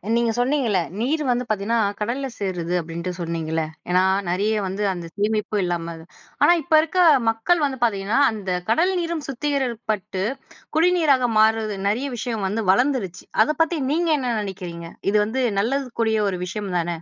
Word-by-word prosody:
நீங்க 235 -1 +2
சொன்னீங்கல்ல 245 -6 +1 0.2
நீர் 300 +6 0
வந்து 245 0 +1
பார்த்தீங்கன்னா 215 +2 0 0.2
கடல்ல 245 +6 -2
சேருது 180 -4 -3
அப்பிடின்ட்டு 170 +2 -5
சொன்னீங்கள்ல, 165 -1 -2 0.3
ஏன்னா 180 +1 +4 0.3
நிறைய 200 +5 +1
வந்து 195 +3 -3
அந்த 175 -1 -7
சேமிப்பு 210 0 0
இல்லாம 170 -1 -2
அத, 160 0 -12 0.4
ஆனா 345 - +7
இப்ப 325 - -4
இருக்க 325 +3 -2 0.3
மக்கள் 295 +9 +1
வந்து 265 -2 -3
பார்த்தீங்கன்னா, 210 +1 +1
அந்த 205 -3 -6 0.2
கடல் 345 +11 +3
நீரும் 335 -3 -3
சுத்திகரிக்கப்பட்டு 240 -8 -2 0.5
குடிநீராக 315 -7 +3
மாறுறது, 220 -1 +2
நிறைய 255 +7 -1
விஷயம் 220 -2 -3
வந்து 215 +3 -2
வளர்ந்துருச்சு. 240 -5 0 0.2
அத - - -4
பத்தி 330 +1 -2
நீங்க 335 +2 +1
என்ன 245 -3 -1
நினைக்கிறீங்க? 180 -4 -6 0.3
இது 210 - +3
வந்து 245 +5 -2 0.2
நல்லதுக்குரிய 235 -2 0
ஒரு 185 -2 -4
விஷயம் 195 +2 -5
தான! 175 0 -1
220 Hz, 150 wpm, -22 LUFS, 190-265 Hz, 0.5 s, ஆனா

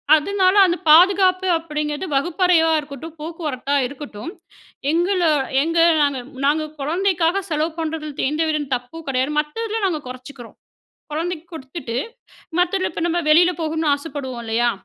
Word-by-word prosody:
அதனால 375 +4 +2
அந்த 350 -1 0
பாதுகாப்பு 370 +3 +5
அப்படிங்கிறது 300 +1 -4
வகுப்பறையா 330 +3 +3
இருக்கட்டும், 295 +2 -9
போக்குவரத்தா 300 -4 -3
இருக்கட்டும், 275 0 -7 0.6
எங்கள 360 +4 +1 0.4
எங்க 330 +2 -1 0.2
நாங்க 285 -3 +1 0.3
நாங்க 305 +2 +2 0.2
குழந்தைக்காக 350 +4 +1
செலவு 310 +1 0
பண்ணுறதில 310 -2 -3
எந்தவித 310 0 0
தப்பும் 250 +7 -8
கிடையாது. 260 +2 0
மத்ததில 435 +9 -3
நாங்க 325 -5 0
குறைச்சிக்கிறோம். 255 -1 -10 0.6
குழந்தைக்கு 335 +1 -3
கொடுத்துட்டு 265 -4 -6 0.6
மத்ததில 370 +1 +1
இப்போ 330 - -4
நம்ம 345 +1 0
வெளியில 345 +3 +6
போகணும்னு 315 -1 0
ஆசைப்படுவோம் 275 -5 -6
இல்லையா, 235 +2 +1
315 Hz, 120 wpm, -21 LUFS, 285-350 Hz, 0.6 s, வெளியில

